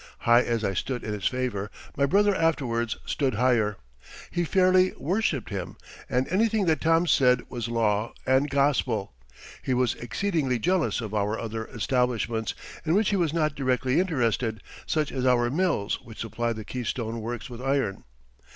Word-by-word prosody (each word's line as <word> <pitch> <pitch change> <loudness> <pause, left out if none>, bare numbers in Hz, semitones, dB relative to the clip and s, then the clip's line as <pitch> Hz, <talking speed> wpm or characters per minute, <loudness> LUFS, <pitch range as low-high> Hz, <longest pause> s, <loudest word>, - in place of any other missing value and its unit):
High 120 +1 +5
as 115 -2 -1
I 100 - 0
stood 125 +6 -3
in 105 - -3
his 105 -2 -1
favor, 120 -6 -2 0.3
my 140 0 +2
brother 205 +6 +4
afterwards 130 -10 0
stood 135 -6 0
higher. 115 -3 +2 0.5
He 175 - 0
fairly 185 +1 +4
worshiped 170 - -1
him, 95 -3 -5 0.3
and 125 +1 +1
anything 215 +2 +2
that 160 -2 +1
Tom 165 +1 +3
said 125 -5 +4
was 120 -2 -4
law 110 -2 0
and 130 +3 +3
gospel. 135 - +1 0.5
He 130 - 0
was 125 -2 +2
exceedingly 145 -1 -1
jealous 175 +1 +1
of 110 -2 -6
our 105 +1 0
other 110 0 -4
establishments, 120 -2 -1 0.3
in 165 +2 +1
which 210 0 +3
he - - +2
was 170 -5 +1
not 155 -2 +1
directly 130 0 +1
interested, 120 - 0 0.2
such 155 -2 0
as 130 - -3
our 120 -2 +3
mills 160 - 0
which 115 -1 -13
supplied 115 0 -2
the 110 -1 -7
Keystone 115 -2 -3
Works 115 -1 -5
with 120 -1 -9
iron. 135 -7 -1
125 Hz, 165 wpm, -26 LUFS, 115-155 Hz, 0.5 s, High